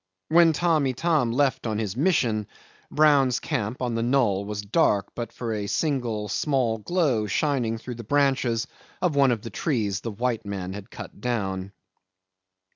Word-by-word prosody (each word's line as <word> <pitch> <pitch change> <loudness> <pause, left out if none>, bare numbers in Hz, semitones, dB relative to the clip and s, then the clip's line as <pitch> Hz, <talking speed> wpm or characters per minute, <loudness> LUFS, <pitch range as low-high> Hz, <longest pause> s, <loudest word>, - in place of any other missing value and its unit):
When 165 +1 +6
Tamb' 160 -3 +2
Itam 135 -1 +1
left 130 -1 +1
on 110 -1 -1
his 105 -2 -3
mission, 125 - +1 0.4
Brown's 140 -5 +4
camp 115 +2 -3
on 120 -1 -1
the 115 - -1
knoll 115 -6 +2
was 105 0 -4
dark 100 -3 +1
but 120 -1 -5
for 115 -2 -4
a 105 -1 -3
single 120 -7 -1
small 120 0 0
glow 130 - 0
shining 125 -4 0
through 125 +2 -7
the - - -11
branches 130 -3 +1 0.3
of 175 -5 0
one 140 -1 +5
of 115 -3 -2
the 115 - -7
trees 105 - -1
the 115 - -4
white 115 +2 -2
men 95 -2 -5
had 100 +2 -9
cut - - -10
down. 100 -6 -2
120 Hz, 165 wpm, -25 LUFS, 105-140 Hz, 0.4 s, When